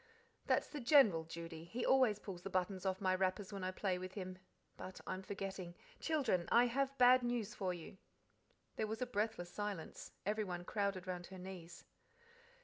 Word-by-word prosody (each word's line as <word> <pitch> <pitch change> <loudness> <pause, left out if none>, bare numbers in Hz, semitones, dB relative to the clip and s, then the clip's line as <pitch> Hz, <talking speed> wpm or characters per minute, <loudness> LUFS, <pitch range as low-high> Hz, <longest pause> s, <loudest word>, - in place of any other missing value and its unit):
"That's - - +3
the 295 - -6
General, 230 - +6
Judy: 165 0 -7
he 225 +9 -3
always 255 -6 +5
pulls 190 -4 -7
the 195 - -5
buttons 185 0 0
off 190 0 0
my 185 -1 +3
wrappers 190 +2 0
when 195 -2 -4
I 185 - 0
play 185 -1 -1
with 185 0 -6
him. 185 -2 -5 0.4
But 185 - -8
I'm 185 - -3
forgetting. 190 -2 -5 0.2
Children, 255 - +1
I 240 +1 +7
have 275 +3 0
bad 255 +1 +8
news 240 -3 -1
for 190 -3 -1
you." 180 +2 -8 0.8
There 215 - 0
was 220 +3 -2
a - - 0
breathless 210 -6 -1
silence. 205 -5 -4
Everyone 195 -4 -1
crowded 200 -3 -1
round 180 -1 -4
her 190 - -9
knees. 180 -2 -8
190 Hz, 175 wpm, -38 LUFS, 180-220 Hz, 0.8 s, bad